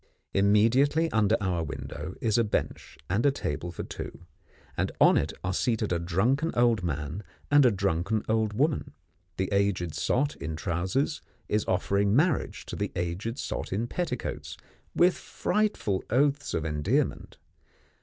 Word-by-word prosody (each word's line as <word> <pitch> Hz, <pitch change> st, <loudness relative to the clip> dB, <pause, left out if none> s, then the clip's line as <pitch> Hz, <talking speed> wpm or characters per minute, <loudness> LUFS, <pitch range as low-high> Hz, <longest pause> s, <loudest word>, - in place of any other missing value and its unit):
Immediately 115 Hz, +11 st, +3 dB
under 110 Hz, 0 st, +3 dB
our 90 Hz, -4 st, -1 dB
window 75 Hz, +2 st, -6 dB
is 110 Hz, 0 st, +2 dB
a -, -, +4 dB
bench 105 Hz, -, -3 dB
and 95 Hz, +7 st, 0 dB
table 85 Hz, -, -3 dB
for 85 Hz, -, -6 dB
two, 85 Hz, -, -8 dB, 0.5 s
and -, -, -1 dB
on -, -, +7 dB
it -, -, +1 dB
are 90 Hz, +1 st, -1 dB
seated 110 Hz, -1 st, 0 dB
a 85 Hz, -, 0 dB
drunken 115 Hz, -, +1 dB
old 120 Hz, -3 st, +3 dB
man 75 Hz, +2 st, -3 dB, 0.3 s
and 145 Hz, -2 st, +7 dB
a -, -, +4 dB
drunken 100 Hz, +2 st, 0 dB
old 110 Hz, -1 st, +1 dB
woman. 145 Hz, +6 st, 0 dB, 0.4 s
The 95 Hz, -, -1 dB
aged 100 Hz, -5 st, +1 dB
sot 140 Hz, +3 st, 0 dB
in 80 Hz, -1 st, -4 dB
trousers 95 Hz, -, -1 dB, 0.3 s
is 105 Hz, 0 st, 0 dB
offering 100 Hz, +2 st, +1 dB
marriage 155 Hz, +1 st, +1 dB
to -, -, -6 dB
the -, -, -2 dB
aged 90 Hz, +8 st, -3 dB
sot -, -, -4 dB
in 105 Hz, +5 st, 0 dB
petticoats 125 Hz, -2 st, -4 dB, 0.4 s
with 180 Hz, +1 st, +5 dB
frightful 210 Hz, -, -1 dB
oaths 140 Hz, +4 st, +1 dB
of 80 Hz, -, -1 dB
endearment. 75 Hz, -2 st, -1 dB
105 Hz, 145 wpm, -28 LUFS, 90-125 Hz, 0.5 s, on